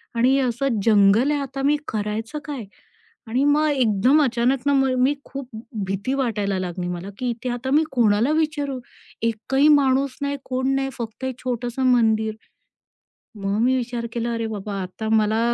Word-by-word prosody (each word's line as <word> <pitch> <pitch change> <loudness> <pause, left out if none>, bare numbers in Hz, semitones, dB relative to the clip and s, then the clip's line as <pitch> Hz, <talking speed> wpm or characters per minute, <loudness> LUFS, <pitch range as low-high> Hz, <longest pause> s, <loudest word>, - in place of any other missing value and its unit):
आणि 255 +4 +3
असं 245 -2 0
जंगल 215 +5 +5
आहे. 290 - 0
आता 275 0 -5
मी 295 +1 +3
करायचं 220 +6 -3
काय? 275 -8 -5 0.6
आणि 250 +5 +1
मग 300 +1 +3
एकदम 255 +2 +3
अचानक 245 +1 +1
ना 285 - +3
मग 270 -1 +3
मी 265 +3 +3
खूप 270 -2 -7 0.4
भीती 200 +7 -2
वाटायला 205 -7 -1
लागली 180 -1 -4
मला, 180 +2 -5
की 250 -1 -2
इथे 240 +2 -4
आता 245 +2 -3
मी 305 +2 +4
कोणाला 230 +1 +3
विचारू? 300 -4 -1 0.4
एकही 255 +6 +1
माणूस 275 -2 +3
नाही, 280 0 -1
कोण 260 +1 -1
नाही. 270 0 0
फक्त 235 +2 -6
एक 260 -1 -4
छोटंसं 245 +1 -3
मंदिर. 220 -2 +2 1.0
मग 200 0 -2
मी 255 +2 +3
विचार 240 -1 -3
केला, 235 0 -2
अरे 230 -1 -2
बाबा! 205 -2 -4
आता 220 +4 -5
मला 220 0 +2
245 Hz, 165 wpm, -22 LUFS, 220-270 Hz, 1.0 s, जंगल